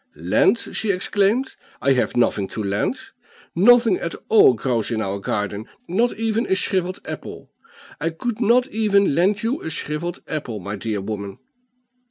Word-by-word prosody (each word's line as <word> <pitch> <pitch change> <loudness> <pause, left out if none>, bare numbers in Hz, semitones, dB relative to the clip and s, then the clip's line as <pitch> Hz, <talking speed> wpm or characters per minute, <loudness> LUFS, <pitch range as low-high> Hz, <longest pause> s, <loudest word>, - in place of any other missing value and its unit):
'Lend!' - - +2 0.2
she 220 - -1
exclaimed, 200 +6 +1 0.2
'I 135 +2 +2
have 125 -1 0
nothing 105 -5 +1
to 110 - -5
lend; 100 +1 -1 0.6
nothing 225 +1 +5
at 170 - -4
all 210 - +6
grows 115 -2 -1
in 115 -2 -1
our 100 -2 -2
garden, 105 +2 -3 0.2
not 230 +7 +1
even 225 +1 -1
a 190 - +2
shrivelled 185 -1 -1
apple; - - -8 0.5
I 165 - 0
could 220 +8 -4
not 240 +3 +4
even 200 - +2
lend 195 +7 +2
you 240 +5 -1
a - - -5
shrivelled 160 +2 -3
apple, 125 -8 -4
my 100 +2 -5
dear 105 0 -3
woman. 100 -1 -5
170 Hz, 160 wpm, -21 LUFS, -, 0.6 s, all